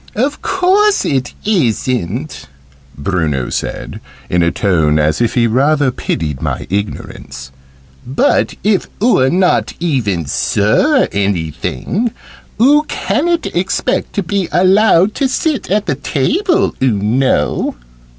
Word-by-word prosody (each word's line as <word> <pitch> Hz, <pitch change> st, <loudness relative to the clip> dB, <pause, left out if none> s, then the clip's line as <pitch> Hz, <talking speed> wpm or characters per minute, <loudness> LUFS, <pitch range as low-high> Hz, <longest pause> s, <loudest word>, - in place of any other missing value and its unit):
"Of 275 Hz, +6 st, -1 dB
course 385 Hz, +3 st, +2 dB
it 130 Hz, -3 st, -1 dB
isn't," 130 Hz, -, -1 dB, 0.5 s
Bruno 75 Hz, -5 st, -1 dB
said, -, -, -5 dB, 0.3 s
in 90 Hz, -, +2 dB
a 85 Hz, -, +3 dB
tone 80 Hz, -6 st, +1 dB
as 75 Hz, +3 st, +1 dB
if 120 Hz, -, 0 dB
he 120 Hz, -2 st, +3 dB
rather 140 Hz, +4 st, +2 dB
pitied 75 Hz, -, -3 dB
my -, -, -3 dB
ignorance; 95 Hz, -9 st, -5 dB, 0.5 s
"but 130 Hz, +3 st, +1 dB
if 205 Hz, -2 st, +1 dB
oo're 200 Hz, -, +3 dB
not 180 Hz, +3 st, +1 dB
even 115 Hz, -, -1 dB
Sir 110 Hz, -, +2 dB
Anything, 100 Hz, -, -2 dB, 0.5 s
oo 285 Hz, +6 st, +5 dB
ca'n't 340 Hz, +3 st, -1 dB
expect 180 Hz, +2 st, -1 dB
to 200 Hz, -, -1 dB
be 190 Hz, 0 st, -2 dB
allowed 190 Hz, +1 st, +4 dB
to 275 Hz, -, 0 dB
sit 305 Hz, +2 st, -1 dB
at 205 Hz, +2 st, +1 dB
the 145 Hz, -, 0 dB
table, 325 Hz, -, 0 dB
oo 130 Hz, -1 st, +3 dB
know." 105 Hz, -, 0 dB
135 Hz, 120 wpm, -15 LUFS, -, 0.5 s, oo